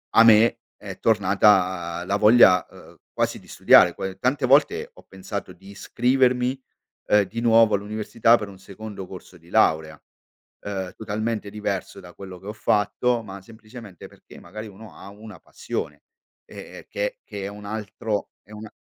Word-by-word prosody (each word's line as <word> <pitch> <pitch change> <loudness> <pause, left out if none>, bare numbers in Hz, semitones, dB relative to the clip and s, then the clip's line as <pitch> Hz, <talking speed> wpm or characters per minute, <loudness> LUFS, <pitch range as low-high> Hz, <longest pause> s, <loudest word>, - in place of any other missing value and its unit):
a 115 - +8
me 115 +1 +5 0.2
è 100 -2 -10
tornata 95 -5 +2
la 100 +2 0
voglia, 105 -4 +6
uhm, - - -17
quasi - - -2
di - - -20
studiare, - - +5
poi 95 -1 -6
tante 130 +2 0
volte 430 - +2
ho - - -17
pensato 95 0 -7
di 95 +2 -17
iscrivermi, 125 +4 0 0.5
ehm, 105 0 +4
di 110 +4 -6
nuovo 115 -2 +4
all'università, 110 +3 +1
per 105 - -6
un 95 -2 -13
secondo 100 0 -9
corso 90 -1 -12
di 85 +1 -21
laurea, 80 -7 +1 0.7
uhm, 95 -2 -4
totalmente 110 0 -4
diverso 100 -2 -5
da 90 -1 -14
quello 95 -1 -11
che 95 - -14
ho - - -4
fatto, 110 +3 0
ma 100 -2 -9
semplicemente 110 -2 -13
perché - - -18
magari 110 +5 -10
uno 105 +1 -13
ha - - -13
una 105 +2 -13
passione - - -6 0.4
e - - -15 0.2
e - - -15
che - - -4
che 100 - -8
è - - -4
un 105 +1 -10
altro 105 0 -4
è 105 - -21
un 110 +1 -9
105 Hz, 165 wpm, -23 LUFS, 95-115 Hz, 0.7 s, a